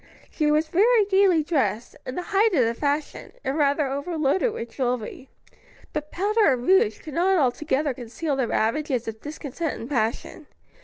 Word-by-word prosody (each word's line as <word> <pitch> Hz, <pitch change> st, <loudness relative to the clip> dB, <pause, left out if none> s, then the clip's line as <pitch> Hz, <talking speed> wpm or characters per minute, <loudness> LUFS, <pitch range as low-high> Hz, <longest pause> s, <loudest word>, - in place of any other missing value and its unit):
She 305 Hz, -2 st, 0 dB
was 305 Hz, +1 st, +2 dB
very 430 Hz, +6 st, +4 dB
gayly 380 Hz, -5 st, +3 dB
dressed, 240 Hz, -, -1 dB
in 255 Hz, -, -4 dB
the 360 Hz, -, -3 dB
height 405 Hz, 0 st, +4 dB
of 255 Hz, -6 st, +4 dB
the 230 Hz, -, 0 dB
fashion, 290 Hz, +4 st, -3 dB
and 270 Hz, -, -2 dB
rather 290 Hz, 0 st, +2 dB
overloaded 305 Hz, -, 0 dB
with 235 Hz, -, -6 dB
jewelry; 250 Hz, 0 st, -3 dB, 0.6 s
but 300 Hz, -1 st, -4 dB
powder 410 Hz, -3 st, +2 dB
and 245 Hz, -1 st, -4 dB
rouge 385 Hz, +6 st, +4 dB
could 305 Hz, -, -9 dB
not 370 Hz, +4 st, +2 dB
altogether 280 Hz, 0 st, 0 dB
conceal 250 Hz, +5 st, -4 dB
the 260 Hz, -3 st, 0 dB
ravages 250 Hz, +2 st, -1 dB
of 220 Hz, -1 st, -6 dB
discontent 300 Hz, +1 st, -5 dB
and 230 Hz, -, -7 dB
passion. 245 Hz, +3 st, -2 dB
295 Hz, 165 wpm, -24 LUFS, 255-345 Hz, 0.6 s, very